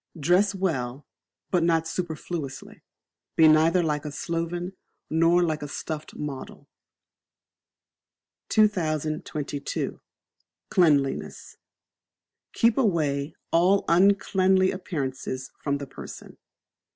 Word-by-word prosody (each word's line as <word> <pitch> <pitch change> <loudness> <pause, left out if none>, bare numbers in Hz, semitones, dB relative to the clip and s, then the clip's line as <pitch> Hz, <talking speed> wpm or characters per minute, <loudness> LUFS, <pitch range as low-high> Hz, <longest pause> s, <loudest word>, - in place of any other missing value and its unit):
Dress 185 +7 +3
Well, 145 -8 -2 0.5
but 180 - +3
not 165 -1 +2
superfluously; 160 -4 -5 0.5
be 160 - +7
neither 160 +3 +5
like 150 -2 -1
a 150 - -5
sloven, 170 +4 -3 0.4
nor 165 +2 +4
like 155 -3 -1
a 145 - -4
stuffed 155 +1 -6
model. 140 -3 -7 1.8
2022. 155 -7 -1 0.7
Cleanliness. 145 -7 +1 1.0
Keep 230 +2 +3
away 155 - 0 0.2
all 185 +4 +3
Uncleanly 190 +1 +4
Appearances 135 -7 -4
from 140 -1 0
the 140 - -6
person. - - -10
165 Hz, 90 wpm, -26 LUFS, 145-180 Hz, 1.8 s, be